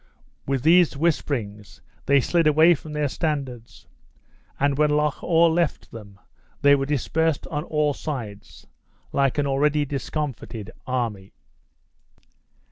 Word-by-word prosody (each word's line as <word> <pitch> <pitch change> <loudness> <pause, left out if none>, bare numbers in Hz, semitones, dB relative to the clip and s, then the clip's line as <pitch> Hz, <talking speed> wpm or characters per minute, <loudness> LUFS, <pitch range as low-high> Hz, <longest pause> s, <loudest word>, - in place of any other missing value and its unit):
With 135 -2 -1
these 165 -2 +4
whisperings, 120 - -2 0.3
they 140 0 +4
slid 170 +3 +1
away 160 +3 +6
from 155 0 -8
their 150 -1 0
standards; 130 - -4 0.7
and 140 0 +2
when 150 +1 +2
Loch 150 -1 0
awe 165 0 +4
left 165 -1 0
them 100 -3 -12 0.4
they 140 0 +7
were 135 -1 +1
dispersed 155 +2 0
on 150 +1 -3
all 150 -3 0
sides, 120 -9 -7 0.5
like 135 -1 +1
an 145 - +1
already 145 +2 +1
discomfited 135 -6 -5 0.2
army. 115 -7 -3
145 Hz, 125 wpm, -23 LUFS, 125-155 Hz, 0.7 s, they